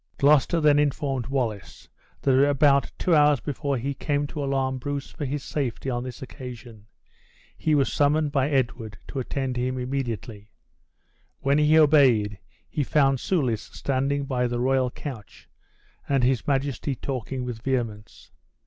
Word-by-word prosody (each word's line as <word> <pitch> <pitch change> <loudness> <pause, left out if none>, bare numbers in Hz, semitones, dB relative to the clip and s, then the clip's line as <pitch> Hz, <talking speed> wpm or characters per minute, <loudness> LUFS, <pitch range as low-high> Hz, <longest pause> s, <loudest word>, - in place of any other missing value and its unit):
Gloucester 150 +4 +4
then 150 -2 +4
informed 140 -3 -1
Wallace 120 -7 -3 0.4
that 135 - +3 0.2
about 140 0 +3
two 180 - +1
hours 150 -2 +5
before 140 0 -2
he 135 +4 -2
came 145 +1 -1
to 145 0 -5
alarm 135 -1 -1
Bruce 145 +1 -4
for 145 - -5
his 140 +1 -3
safety 135 -2 -3
on 120 0 -2
this 125 0 -7
occasion, 120 -5 -10 0.7
he 155 -1 +1
was 140 -2 +1
summoned 150 +1 +2
by 140 -1 +1
Edward 120 -6 -1
to 135 - -4
attend 130 0 -3
him 130 +1 -1
immediately. 120 -5 -4 0.9
When 140 +2 +2
he 150 +1 +5
obeyed, 130 -10 +4 0.3
he 150 - -2
found 135 -2 +2
Soulis 125 - -1
standing 140 +1 -1
by 125 -2 0
the 120 0 -2
royal 130 0 +2
couch, 125 -4 -9 0.6
and 135 -2 +2
his 125 -1 +1
majesty 135 -1 -1
talking 130 0 -4
with 120 -3 -6
vehemence. 115 -5 -4
135 Hz, 150 wpm, -25 LUFS, 125-145 Hz, 0.9 s, hours